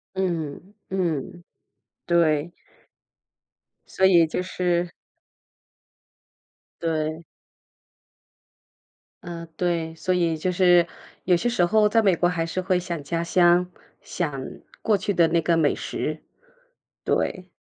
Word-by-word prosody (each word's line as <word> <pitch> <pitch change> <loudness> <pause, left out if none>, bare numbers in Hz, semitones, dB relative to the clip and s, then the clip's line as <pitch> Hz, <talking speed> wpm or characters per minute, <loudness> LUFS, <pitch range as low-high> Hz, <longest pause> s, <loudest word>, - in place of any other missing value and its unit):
嗯， 175 0 -3 0.2
嗯， 175 -2 -2 0.6
对。 165 -2 +2 1.5
所 190 - +6
以 170 -4 +5
就 170 - -2
是 180 -1 0 1.9
对。 160 0 -2 2.0
嗯， 170 -1 -7
对， 170 -2 -1
所 185 +3 -1
以 170 -2 +1
就 180 +4 -1
是 175 -1 +5 0.4
有 180 -1 +4
些 240 +8 0
时 180 -8 +2
候 210 +3 +4
在 225 +2 +3
美 195 -4 +4
国 175 +1 +1
还 165 -2 -1
是 185 +2 -3
会 185 0 +1
想 175 -3 -5
家 165 +3 -2
乡， 175 +1 +4 0.3
想 145 -7 -4 0.4
过 215 -2 +2
去 200 +1 -2
的 170 -2 +4
那 170 0 +2
个 170 -1 +2
美 155 -3 +2
食。 - - -4 0.8
对。 185 -1 -1
175 Hz, 120 characters per minute, -24 LUFS, 165-185 Hz, 2.0 s, 所